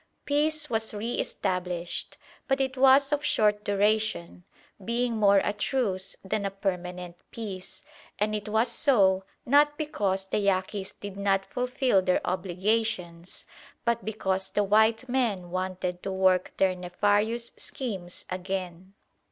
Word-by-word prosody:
Peace 300 Hz, +1 st, +1 dB
was 225 Hz, -3 st, -2 dB
re 225 Hz, +4 st, -3 dB
established; 180 Hz, -2 st, -3 dB, 0.3 s
but 270 Hz, -1 st, +1 dB
it 265 Hz, -1 st, 0 dB
was 270 Hz, +2 st, +5 dB
of 295 Hz, 0 st, 0 dB
short 210 Hz, -7 st, +2 dB
duration, 205 Hz, -, 0 dB, 0.4 s
being 235 Hz, +2 st, 0 dB
more 200 Hz, -2 st, +5 dB
a 205 Hz, -, 0 dB
truce 210 Hz, -4 st, -1 dB
than 200 Hz, +2 st, -1 dB
a 200 Hz, -, 0 dB
permanent 180 Hz, -3 st, -4 dB
peace, 200 Hz, -5 st, -7 dB, 0.3 s
and 210 Hz, +1 st, 0 dB
it 210 Hz, 0 st, -3 dB
was 220 Hz, +3 st, +2 dB
so 195 Hz, -9 st, +3 dB, 0.2 s
not 295 Hz, +3 st, +4 dB
because 200 Hz, -11 st, -1 dB
the 195 Hz, -, -1 dB
Yaquis 195 Hz, 0 st, -1 dB
did 200 Hz, -1 st, -7 dB
not 195 Hz, -1 st, +1 dB
fulfil 250 Hz, -5 st, +1 dB
their 185 Hz, -1 st, +2 dB
obligations, 185 Hz, -1 st, -2 dB, 0.4 s
but 235 Hz, 0 st, +1 dB
because 190 Hz, -3 st, -1 dB
the 205 Hz, -, +1 dB
white 220 Hz, +4 st, +3 dB
men 220 Hz, -9 st, -1 dB
wanted 185 Hz, -1 st, -3 dB
to 195 Hz, -, -4 dB
work 185 Hz, -1 st, +2 dB
their 190 Hz, -1 st, +3 dB
nefarious 205 Hz, +6 st, 0 dB
schemes 190 Hz, -9 st, -6 dB
again. 185 Hz, 0 st, -5 dB
205 Hz, 135 wpm, -27 LUFS, 185-235 Hz, 0.4 s, was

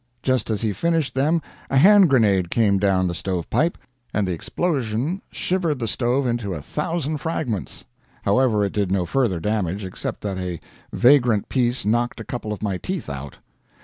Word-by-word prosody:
Just 130 Hz, -4 st, +1 dB
as 110 Hz, -2 st, -1 dB
he 110 Hz, -3 st, 0 dB
finished 165 Hz, -, 0 dB
them 150 Hz, +4 st, +1 dB, 0.3 s
a 135 Hz, -, +2 dB
hand 195 Hz, +4 st, +7 dB
grenade 100 Hz, -9 st, +3 dB
came 100 Hz, -3 st, +2 dB
down 95 Hz, -2 st, +2 dB
the 85 Hz, -, -2 dB
stove 90 Hz, -1 st, -3 dB
pipe, 165 Hz, +3 st, +1 dB, 0.3 s
and 105 Hz, -3 st, 0 dB
the -, -, -1 dB
explosion 135 Hz, -, -1 dB
shivered 175 Hz, -5 st, 0 dB
the 115 Hz, -3 st, -3 dB
stove 125 Hz, +4 st, 0 dB
into 120 Hz, -6 st, -1 dB
a 75 Hz, -, -6 dB
thousand 155 Hz, -, -2 dB
fragments. 120 Hz, -, -3 dB, 0.4 s
However, 120 Hz, -5 st, +3 dB
it 100 Hz, -, -1 dB
did 100 Hz, -3 st, 0 dB
no 95 Hz, -2 st, +1 dB
further 110 Hz, -3 st, 0 dB
damage, 100 Hz, 0 st, -1 dB
except 95 Hz, -, -5 dB
that 95 Hz, -2 st, -3 dB
a 90 Hz, -3 st, -4 dB, 0.3 s
vagrant 120 Hz, -5 st, +4 dB
piece 125 Hz, -2 st, 0 dB
knocked 120 Hz, +2 st, 0 dB
a -, -, -5 dB
couple 110 Hz, -1 st, -5 dB
of 105 Hz, -, -5 dB
my 95 Hz, -3 st, -1 dB
teeth 185 Hz, -, -4 dB
out. 70 Hz, 0 st, -7 dB
115 Hz, 180 wpm, -22 LUFS, 100-135 Hz, 0.4 s, hand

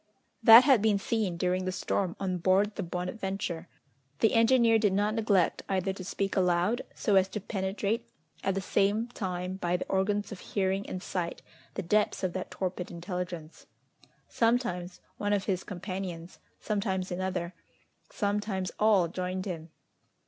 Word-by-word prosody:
That 230 Hz, +1 st, +10 dB
had 260 Hz, -5 st, +5 dB
been 215 Hz, -1 st, +3 dB
seen, 200 Hz, -3 st, -1 dB
during 185 Hz, +1 st, 0 dB
the 185 Hz, -, -1 dB
storm, 185 Hz, 0 st, -1 dB
on 185 Hz, -2 st, -1 dB
board 195 Hz, +4 st, +3 dB
the 205 Hz, -, -4 dB
Bonadventure! 180 Hz, -1 st, -4 dB, 0.5 s
The 225 Hz, -, +3 dB
engineer 230 Hz, -1 st, +5 dB
did 205 Hz, -3 st, +2 dB
not 205 Hz, +2 st, +1 dB
neglect 210 Hz, -5 st, +2 dB
either 190 Hz, 0 st, 0 dB
to 190 Hz, -, -8 dB
speak 195 Hz, +1 st, -2 dB
aloud, 180 Hz, +5 st, +2 dB
so 205 Hz, -3 st, +2 dB
as 190 Hz, 0 st, +4 dB
to 210 Hz, -, -4 dB
penetrate 200 Hz, +3 st, -2 dB, 0.3 s
at 195 Hz, -1 st, 0 dB
the 195 Hz, -, -1 dB
same 205 Hz, +4 st, +1 dB
time 185 Hz, -4 st, -4 dB
by 175 Hz, -1 st, 0 dB
the -, -, -4 dB
organs 205 Hz, +2 st, 0 dB
of 200 Hz, -, -7 dB
hearing 195 Hz, 0 st, -1 dB
and 185 Hz, 0 st, -5 dB
sight 175 Hz, -2 st, -3 dB, 0.3 s
the 195 Hz, -, -3 dB
depths 210 Hz, +3 st, +1 dB
of 185 Hz, -2 st, 0 dB
that 185 Hz, -, -4 dB
torpid 185 Hz, -1 st, -4 dB
intelligence. 175 Hz, -2 st, -6 dB, 0.6 s
Sometimes 210 Hz, -7 st, 0 dB, 0.2 s
one 205 Hz, 0 st, 0 dB
of 200 Hz, -2 st, +1 dB
his 190 Hz, -3 st, -1 dB
companions, 185 Hz, -2 st, -6 dB, 0.2 s
sometimes 195 Hz, -3 st, -2 dB
another, 180 Hz, -1 st, -2 dB, 0.6 s
sometimes 205 Hz, -2 st, -1 dB
all 210 Hz, -5 st, +4 dB
joined 185 Hz, +2 st, -3 dB
him. 165 Hz, -4 st, -5 dB
190 Hz, 155 wpm, -29 LUFS, 180-205 Hz, 0.6 s, That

